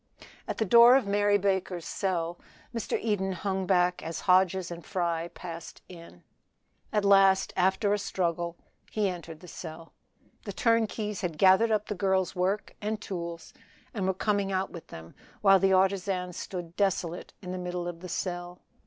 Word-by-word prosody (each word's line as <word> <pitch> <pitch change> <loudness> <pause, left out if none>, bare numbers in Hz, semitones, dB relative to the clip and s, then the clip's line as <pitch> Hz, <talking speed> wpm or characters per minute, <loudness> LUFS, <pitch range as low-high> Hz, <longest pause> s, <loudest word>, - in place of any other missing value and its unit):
At - - -3
the 220 - +1
door 235 +5 +8
of 270 - +3
Mary 205 0 +3
Baker's 190 -3 -1
cell 175 -3 -2 0.3
Mr. 230 -2 -2
Eden 195 -4 -1
hung 190 0 -2
back 180 -1 +2
as 165 0 -5
Hodges 185 -1 +3
and 170 0 -7
Fry 170 -3 -1
passed 170 -2 -8
in. 170 - -13 0.7
At 210 -1 +1
last, 195 -1 +5
after 190 +3 +2
a 205 - 0
struggle, 170 -3 -2 0.3
he 210 -2 0
entered 170 -3 -8
the 180 - -12
cell. 165 -1 -9 0.5
The 200 - -5
turnkeys 220 -2 0
had 170 -5 -3
gathered 190 +6 +5
up 215 -1 +1
the - - -3
girl's 190 -1 0
work 190 +3 -1
and 210 +1 -2
tools, 170 -4 -6 0.4
and 195 -5 -2
were 190 - +1
coming 200 0 0
out 190 0 -1
with 170 - -10
them, 80 0 -11 0.3
while 195 -1 +6
the 195 0 +3
artisan 185 -1 +1
stood 175 -1 -6
desolate 185 -4 -1
in 180 - -5
the 185 - -4
middle 180 -1 -4
of 175 -1 -6
the 180 +1 -8
cell. 175 0 -4
185 Hz, 170 wpm, -28 LUFS, 175-200 Hz, 0.7 s, door